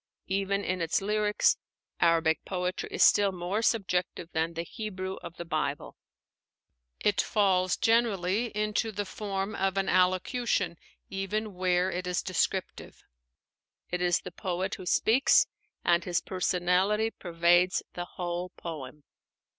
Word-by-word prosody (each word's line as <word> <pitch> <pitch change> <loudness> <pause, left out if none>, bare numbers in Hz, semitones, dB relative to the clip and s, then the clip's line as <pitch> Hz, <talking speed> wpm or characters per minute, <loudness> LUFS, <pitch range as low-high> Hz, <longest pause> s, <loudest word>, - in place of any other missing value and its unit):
Even 200 +1 0
in 185 -2 -2
its 165 0 +1
lyrics, 210 +1 +2 0.4
Arabic 165 -1 +3
poetry 180 -1 -3
is - - +3
still 200 -1 +5
more 185 +4 -2
subjective 180 -6 0
than 160 +1 -1
the 165 - -2
Hebrew 190 -1 -5
of 170 - -9
the 170 - -6
Bible. 150 -3 -2 1.0
It 205 -1 +2
falls 185 -3 +2
generally 225 -2 +2
into 215 +1 0
the 205 0 -3
form 195 0 -3
of 195 0 -1
an 195 0 +1
allocution, 185 0 +1 0.3
even 205 +2 -2
where 180 0 +1
it 180 0 -3
is 180 0 -1
descriptive. 185 0 -2 0.9
It 180 0 -1
is 175 -1 +2
the 180 - -8
poet 185 +2 -3
who 185 - -7
speaks, 235 +9 +4 0.4
and 170 0 +3
his 175 -1 0
personality 185 +4 +1
pervades 175 +1 +2
the 175 - -4
whole 175 0 -3
poem. 150 -3 -7
185 Hz, 130 wpm, -29 LUFS, 175-200 Hz, 1.0 s, still